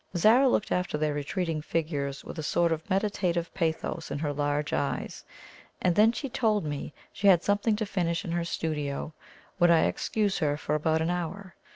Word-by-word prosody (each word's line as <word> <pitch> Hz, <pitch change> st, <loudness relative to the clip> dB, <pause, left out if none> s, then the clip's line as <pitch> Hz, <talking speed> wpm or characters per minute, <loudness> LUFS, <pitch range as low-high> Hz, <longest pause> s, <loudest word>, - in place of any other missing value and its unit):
Zara 235 Hz, +9 st, +5 dB
looked 210 Hz, -, 0 dB
after 180 Hz, -4 st, 0 dB
their 150 Hz, -1 st, 0 dB
retreating 155 Hz, +2 st, -2 dB
figures 145 Hz, -4 st, -2 dB
with 170 Hz, -, -7 dB
a -, -, -1 dB
sort 170 Hz, +2 st, +1 dB
of 160 Hz, +3 st, -3 dB
meditative 185 Hz, -4 st, 0 dB
pathos 165 Hz, -1 st, -2 dB
in -, -, -3 dB
her 145 Hz, 0 st, -2 dB
large 145 Hz, +1 st, -1 dB
eyes; 140 Hz, -, -2 dB, 0.6 s
and 180 Hz, -, +2 dB
then 215 Hz, +4 st, +6 dB
she 275 Hz, +4 st, -4 dB
told 215 Hz, -7 st, +1 dB
me 145 Hz, -1 st, -4 dB, 0.2 s
she 200 Hz, -, 0 dB
had 180 Hz, -3 st, +6 dB
something 205 Hz, +2 st, +2 dB
to 215 Hz, +1 st, -2 dB
finish 180 Hz, -2 st, -1 dB
in 170 Hz, -, -4 dB
her 170 Hz, 0 st, 0 dB
studio 155 Hz, -3 st, -3 dB, 0.5 s
would 175 Hz, -1 st, +5 dB
I 165 Hz, -1 st, +6 dB
excuse 205 Hz, -3 st, 0 dB
her 145 Hz, -3 st, +1 dB
for 150 Hz, -, -3 dB
about 160 Hz, +1 st, +1 dB
an 165 Hz, -, 0 dB
hour? 180 Hz, +2 st, -4 dB
170 Hz, 190 wpm, -28 LUFS, 150-195 Hz, 0.6 s, then